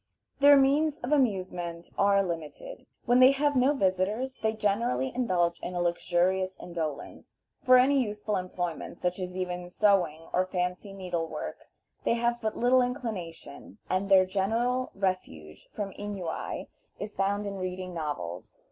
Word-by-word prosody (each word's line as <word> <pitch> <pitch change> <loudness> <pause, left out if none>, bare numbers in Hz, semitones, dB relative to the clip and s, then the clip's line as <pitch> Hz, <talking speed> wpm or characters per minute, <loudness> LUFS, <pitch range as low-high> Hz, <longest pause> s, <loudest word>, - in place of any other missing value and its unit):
Their 285 0 +8
means 285 +3 +3
of 245 - -4
amusement 185 - -1
are 200 0 +4
limited. 170 - -6 0.2
When 245 +1 +4
they 255 0 +9
have 290 +1 +1
no 265 +3 +4
visitors 205 +5 0
they 220 0 0
generally 200 - 0
indulge 180 -9 +1
in 180 - -6
a - - -1
luxurious 180 +2 +1
indolence. 160 -4 -6 0.2
For 255 -2 +7
any 270 +2 +4
useful 210 -2 -2
employment, 175 -2 -4
such 180 +1 -1
as 180 0 -5
even 180 -1 -4
sewing 180 -6 +2
or 185 +1 +2
fancy 180 +2 -3
needlework, 180 -4 -5 0.3
they - - +2
have 235 0 0
but 220 -1 -2
little 250 +2 +4
inclination, 215 - -5
and 190 +2 0
their 190 -1 +7
general 230 +7 0
refuge 135 - -3
from 205 -2 -4
ennui 195 -5 -5 0.3
is 205 0 -5
found 200 +2 0
in 200 -1 -4
reading 185 0 -4
novels. 145 - -5
195 Hz, 145 wpm, -28 LUFS, 175-235 Hz, 0.3 s, they